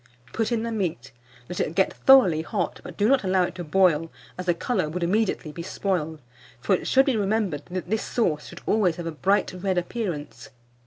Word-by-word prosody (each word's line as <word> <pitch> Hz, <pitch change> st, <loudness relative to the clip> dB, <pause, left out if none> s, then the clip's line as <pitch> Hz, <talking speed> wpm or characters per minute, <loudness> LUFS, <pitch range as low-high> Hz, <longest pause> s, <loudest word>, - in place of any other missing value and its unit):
Put 225 Hz, +1 st, -1 dB
in 230 Hz, -1 st, 0 dB
the 230 Hz, -, -3 dB
meat, 175 Hz, -, -3 dB, 0.4 s
let 180 Hz, -, -5 dB
it 165 Hz, -, -1 dB
get 190 Hz, -, +2 dB
thoroughly 230 Hz, -13 st, +5 dB
hot, 175 Hz, +2 st, -3 dB
but -, -, -10 dB
do 205 Hz, -, +3 dB
not 270 Hz, -1 st, +3 dB
allow 185 Hz, -1 st, +2 dB
it -, -, -3 dB
to 175 Hz, -, -6 dB
boil, 165 Hz, -1 st, +2 dB, 0.2 s
as 185 Hz, 0 st, -7 dB
the 175 Hz, -, +3 dB
colour 185 Hz, -4 st, -1 dB
would 175 Hz, +3 st, -3 dB
immediately 185 Hz, -3 st, 0 dB
be 170 Hz, -, -7 dB
spoiled; 160 Hz, -5 st, -3 dB, 0.4 s
for 160 Hz, -, +1 dB
it 185 Hz, -, 0 dB
should 270 Hz, +1 st, +5 dB
be 270 Hz, -, +1 dB
remembered 200 Hz, -7 st, -1 dB
that 185 Hz, 0 st, -5 dB
this 220 Hz, -, +1 dB
sauce 160 Hz, -11 st, -1 dB
should -, -, -11 dB
always 200 Hz, -6 st, +2 dB
have 175 Hz, -, -6 dB
a 165 Hz, -, -2 dB
bright 195 Hz, +5 st, +1 dB
red 190 Hz, -1 st, 0 dB
appearance. 175 Hz, -, -4 dB
185 Hz, 210 wpm, -25 LUFS, 165-215 Hz, 0.4 s, thoroughly